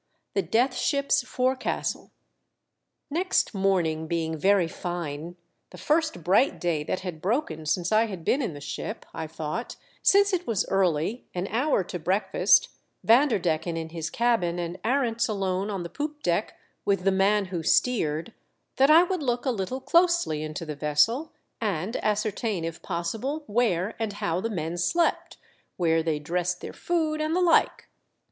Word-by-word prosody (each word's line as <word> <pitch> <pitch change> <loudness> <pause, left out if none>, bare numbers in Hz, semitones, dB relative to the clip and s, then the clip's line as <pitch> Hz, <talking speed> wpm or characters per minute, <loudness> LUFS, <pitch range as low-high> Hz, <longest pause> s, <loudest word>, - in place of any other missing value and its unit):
THE 195 - +2
DEATH 245 +6 +1
SHIP's 280 0 +1
FORECASTLE. 255 +1 -1 1.0
Next 360 -1 +1
morning 175 -5 +1
being 160 -1 -1
very 190 +2 +3
fine 170 -1 -5 0.2
— - - -50
the - - -12
first 310 - 0
bright 200 - +3
day 170 -4 0
that 185 - -2
had 175 -4 -6
broken 180 - -1
since 175 +4 0
I 220 +1 +4
had 185 -6 -8
been 275 - +2
in 205 - -3
the 145 - -9
ship 140 0 -5
— - - -32
I 160 - -4
thought, 155 +9 -5 0.3
since 400 0 +4
it 355 -1 -1
was 225 -5 0
early, 190 +3 0
an 180 +1 -1
hour 245 -2 +2
to 180 0 -6
breakfast, 185 +6 +3 0.3
Vanderdecken 185 - +2
in 160 0 -4
his 165 -1 -4
cabin 225 -8 +1
and 175 +1 -4
Arents 235 -1 +1
alone 195 -1 -1
on 195 -4 -3
the - - -4
poop 295 - -5
deck 175 +5 0 0.3
with 195 -2 +1
the 195 - +3
man 195 +2 +3
who 170 - -1
steered, 165 -1 +1 0.4
that 270 +2 +5
I 325 +3 +8
would 360 -1 -2
look 245 -3 -1
a - - +2
Httle 245 +4 -3
closely 340 - +3
into 155 +2 -5
the 155 - -4
vessel, 155 - +1 0.3
and 205 +1 -2
ascertain 210 -3 -1
if 165 0 -6
pos 170 -2 -2
sible 275 +8 -4
where 210 -5 +1
and 220 -2 -2
how 175 -3 -2
the 230 - -2
men 170 -4 -3
slept, 335 - 0 0.4
where 165 -2 +2
they 160 -2 -1
dressed 180 +4 -2
their - - -8
food 315 -3 -1
and 310 +2 0
the - - +2
like. 340 -2 +3
195 Hz, 170 wpm, -26 LUFS, 170-250 Hz, 1.0 s, I